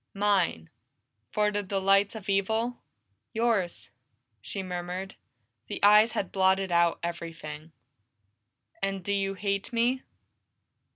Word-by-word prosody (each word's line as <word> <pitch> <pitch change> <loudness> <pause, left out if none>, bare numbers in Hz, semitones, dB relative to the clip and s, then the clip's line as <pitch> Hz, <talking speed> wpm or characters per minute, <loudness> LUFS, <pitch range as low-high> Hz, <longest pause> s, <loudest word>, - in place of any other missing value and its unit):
"Mine 195 - +1 0.6
for 210 0 +2
the 205 0 -1
delights 195 +1 +2
of 215 -3 -8
evil?" 220 +5 0 0.5
"Yours!" 195 - 0 0.5
she 195 - -5
murmured. 180 +1 -5 0.5
The - - -5
eyes 210 +2 +7
had 190 - -2
blotted 190 0 +2
out 170 -1 +3
everything. 165 -2 -6 1.1
"And 195 -1 -2
do 200 - -1
you 195 -1 0
hate 200 +2 -2
me?" 240 +2 +1
195 Hz, 110 wpm, -28 LUFS, 175-205 Hz, 1.1 s, eyes